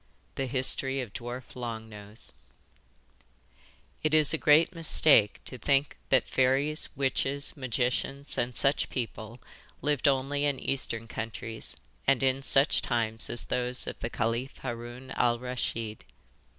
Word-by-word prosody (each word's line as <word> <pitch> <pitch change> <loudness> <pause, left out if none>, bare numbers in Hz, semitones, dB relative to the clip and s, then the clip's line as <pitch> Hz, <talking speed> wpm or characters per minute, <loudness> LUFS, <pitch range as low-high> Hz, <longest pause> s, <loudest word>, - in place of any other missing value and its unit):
THE 135 - -2
HISTORY 130 +1 +2
OF 115 -6 -8
DWARF 120 +1 -7
LONG 115 -3 -5
NOSE 105 0 -7 1.7
It 155 0 +2
is 155 -1 +5
a - - +2
great 155 +4 +5
mistake 155 - +5
to 125 - -7
think 140 +1 +1
that 130 - +4
fairies, 135 +4 +2
witches, 140 +1 0
magicians, 130 +2 -2
and 120 0 -1
such 135 +1 +3
people 115 -1 -5 0.4
lived 145 -1 +1
only 140 +1 +1
in 140 -2 0
Eastern 115 -4 -2
countries 115 0 -5 0.3
and 135 -1 +3
in 135 0 +2
such 135 +1 +3
times 110 -1 0
as 120 - 0
those 125 0 0
of - - -6
the 115 - -3
Caliph 115 +4 -2
Haroun 120 +1 -6
Al 120 -1 +2
Raschid. 115 -3 -4
130 Hz, 135 wpm, -29 LUFS, 115-135 Hz, 1.7 s, is